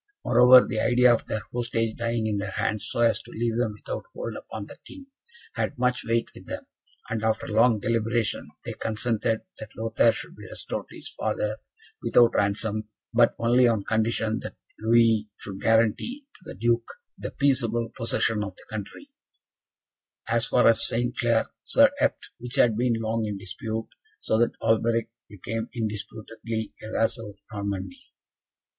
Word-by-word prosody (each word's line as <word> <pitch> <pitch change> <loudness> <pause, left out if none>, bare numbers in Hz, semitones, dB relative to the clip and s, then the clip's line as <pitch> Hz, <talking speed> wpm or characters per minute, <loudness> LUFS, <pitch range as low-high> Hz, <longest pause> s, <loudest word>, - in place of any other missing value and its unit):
Moreover, 125 +1 +8
the 110 - -2
idea 125 +2 +5
of 115 - -2
their 110 - -2
hostage 115 -2 -1
dying 115 -1 -1
in 105 -2 0
their 100 0 -3
hands, 105 -1 -1
so 120 - -1
as 115 -1 +3
to - - -14
leave 115 0 -1
them 115 -3 0
without 105 - -6
hold - - -5
upon 105 -2 -7
the - - -12
King, 280 -1 -12 0.5
had - - -2
much 125 0 +1
weight 115 0 0
with - - -14
them; - - -6 0.5
and, 115 -1 -1
after 110 0 0
long 110 +1 +4
deliberation, 115 0 -1 0.2
they - - -4
consented 110 0 -1 0.2
that 110 - -10
Lothaire 115 +1 +3
should - - -8
be - - -11
restored - - -6
to - - -13
his - - -8
father, 105 +1 -2 0.4
without 120 -1 +4
ransom 105 +1 0 0.3
but - - +4
only 120 +2 +4
on 110 -4 +1
condition 110 +1 0
that - - -8 0.2
Louis 110 -1 +3
should 95 -2 -8
guarantee 115 - +1
to - - -20
the - - -8
Duke 115 +2 +1 0.3
the - - -6
peaceable 120 -4 +1
possession 115 -2 0
of 100 -3 -6
the - - -17
country, 110 - -7 1.2
as 115 0 +1
far 125 +1 +4
as 115 - +5
St. 120 +2 +1
Clair 115 -2 +2 0.2
sur - - +5
Epte, - - 0
which 125 0 -7
had 115 -3 +4
been 120 +1 +2
long 115 0 -1
in 105 -1 -3
dispute; 110 +4 -5 0.3
so 110 - 0
that 120 - +2
Alberic 115 0 +2 0.2
became, 110 +3 -5
indisputably, 110 0 -4
a 110 - -8
vassal 115 -1 0
of 100 - -13 0.2
Normandy. 100 -3 -4
115 Hz, 165 wpm, -26 LUFS, 110-120 Hz, 1.2 s, Moreover